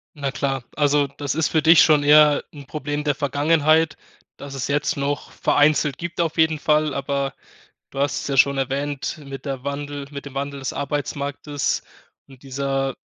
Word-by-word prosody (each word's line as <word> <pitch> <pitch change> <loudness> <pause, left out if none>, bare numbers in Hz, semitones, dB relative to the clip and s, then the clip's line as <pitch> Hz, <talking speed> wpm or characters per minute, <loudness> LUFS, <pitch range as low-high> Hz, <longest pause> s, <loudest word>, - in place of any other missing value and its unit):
Na 140 -2 -3
klar, 135 0 -2
also 145 -1 +3
das 140 0 -4
ist 160 -1 +1
für 155 - +2
dich 165 +1 +7
schon 150 -2 +4
eher 150 0 +6
'n 145 -2 -11
Problem 145 +1 -4
der 145 -1 +1
Vergangenheit, 155 +2 +2 0.4
dass 140 -1 -8
es 130 - -3
jetzt 145 0 0
noch 140 +1 -3
vereinzelt 145 -2 +2
gibt 170 0 -6
auf 165 -2 0
jeden 160 -1 +3
Fall, 150 0 +1
aber 140 -1 -2 0.6
du 135 - -8
hast 140 +1 0
es - - -5
ja 140 - -1
schon 140 +2 +4
erwähnt 140 +2 -3
mit 135 -1 -8
der 135 -3 -5
Wandel 140 0 -4
mit 140 0 -7
dem 140 -1 -10
Wandel 140 0 -4
des 135 - -3
Arbeitsmarktes 145 0 -3 0.5
und 135 -2 -17
dieser 135 0 -2
145 Hz, 180 wpm, -22 LUFS, 140-150 Hz, 0.6 s, dich